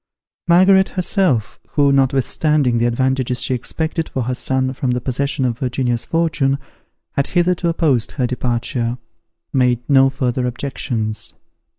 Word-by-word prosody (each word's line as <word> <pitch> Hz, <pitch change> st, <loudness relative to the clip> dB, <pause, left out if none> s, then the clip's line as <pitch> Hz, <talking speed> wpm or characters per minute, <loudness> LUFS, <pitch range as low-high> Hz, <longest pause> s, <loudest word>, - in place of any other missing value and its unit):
Margaret 190 Hz, +2 st, +5 dB
herself, 180 Hz, -, 0 dB
who, 145 Hz, -2 st, +3 dB
notwithstanding 135 Hz, -1 st, +2 dB
the 120 Hz, -, +2 dB
advantages 130 Hz, 0 st, 0 dB
she -, -, 0 dB
expected 160 Hz, +6 st, -3 dB
for 130 Hz, -, -2 dB
her 125 Hz, +2 st, -2 dB
son 130 Hz, +1 st, 0 dB
from 130 Hz, -1 st, -2 dB
the 125 Hz, 0 st, +1 dB
possession 135 Hz, +2 st, -1 dB
of 120 Hz, -2 st, -2 dB
Virginia's 125 Hz, -2 st, -1 dB
fortune, 155 Hz, -5 st, +1 dB, 0.5 s
had 140 Hz, -, -1 dB
hitherto 175 Hz, -1 st, +1 dB
opposed 150 Hz, -8 st, +1 dB
her 130 Hz, -, 0 dB
departure, 120 Hz, -1 st, -2 dB, 0.6 s
made 125 Hz, -2 st, +1 dB
no 135 Hz, -2 st, +5 dB
further 125 Hz, -2 st, -1 dB
objections. 120 Hz, -4 st, -4 dB
130 Hz, 130 wpm, -19 LUFS, 125-150 Hz, 0.6 s, Margaret